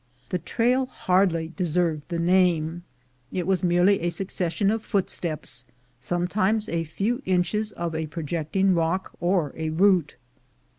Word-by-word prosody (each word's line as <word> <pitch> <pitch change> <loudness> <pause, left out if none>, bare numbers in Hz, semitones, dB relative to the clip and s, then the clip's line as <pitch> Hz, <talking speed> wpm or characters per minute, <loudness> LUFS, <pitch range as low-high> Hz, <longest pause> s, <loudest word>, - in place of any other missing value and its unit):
The 180 - -1
trail 245 +9 +1
hardly 180 -7 +1
deserved 170 -4 0
the 170 - -2
name 170 -2 +2 0.3
— 125 0 -39
it 180 -2 -2
was 190 0 +1
merely 180 +3 +4
a 175 - +1
succession 190 +1 -1
of 225 0 -1
footsteps, 170 - -3 0.4
sometimes 185 - 0
a 165 0 -1
few 215 - -1
inches 190 +3 0
of 170 -1 -3
a 160 0 -2
projecting 165 +4 0
rock, 170 +2 0
or 175 -5 +1
a 160 -1 -3
root. 175 -1 +3
175 Hz, 140 wpm, -25 LUFS, 165-195 Hz, 0.4 s, merely